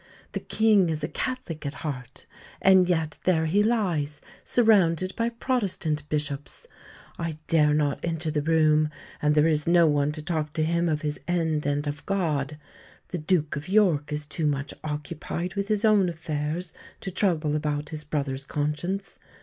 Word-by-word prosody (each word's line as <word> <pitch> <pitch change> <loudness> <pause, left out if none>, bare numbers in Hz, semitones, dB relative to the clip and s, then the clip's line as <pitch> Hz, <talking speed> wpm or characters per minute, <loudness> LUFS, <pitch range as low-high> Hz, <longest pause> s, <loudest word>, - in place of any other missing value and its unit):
The - - -3
King 215 -5 +3
is 155 -2 -2
a - - +1
Catholic 215 -9 -4
at 140 0 -4
heart, 130 -4 -6 0.3
and 190 -1 +5
yet 160 -3 0
there 165 -3 +2
he 190 +6 +3
lies 175 -10 0 0.2
surrounded 190 -6 +3
by 230 0 0
Protestant 195 - -1
bishops. 145 - -2 0.5
I 165 -2 -3
dare 150 -2 +4
not 145 -2 +1
enter 165 -1 -1
the 150 -1 0
room, 155 -1 +3 0.3
and 150 0 +3
there 150 0 +5
is 155 -2 +1
no 170 0 +6
one 145 -1 +2
to 155 -1 -6
talk 155 -2 -2
to 155 - 0
him 170 +1 +1
of 155 -1 -1
his 150 -1 -2
end 160 -4 0
and 145 +1 0
of 145 0 -4
God. 155 -7 0 0.5
The 180 - -3
Duke 155 -2 +1
of 145 +4 -6
York 180 -8 +3
is 150 0 -2
too 155 +1 -1
much 140 0 -2
occupied 155 +3 -4
with 200 0 -2
his 215 0 +1
own 205 -4 +5
affairs 160 +1 -3 0.3
to 190 - -4
trouble 165 -6 +1
about 150 0 -2
his 155 -1 -5
brother's 140 -2 -3
conscience. 165 +7 -3
155 Hz, 170 wpm, -26 LUFS, 150-180 Hz, 0.5 s, no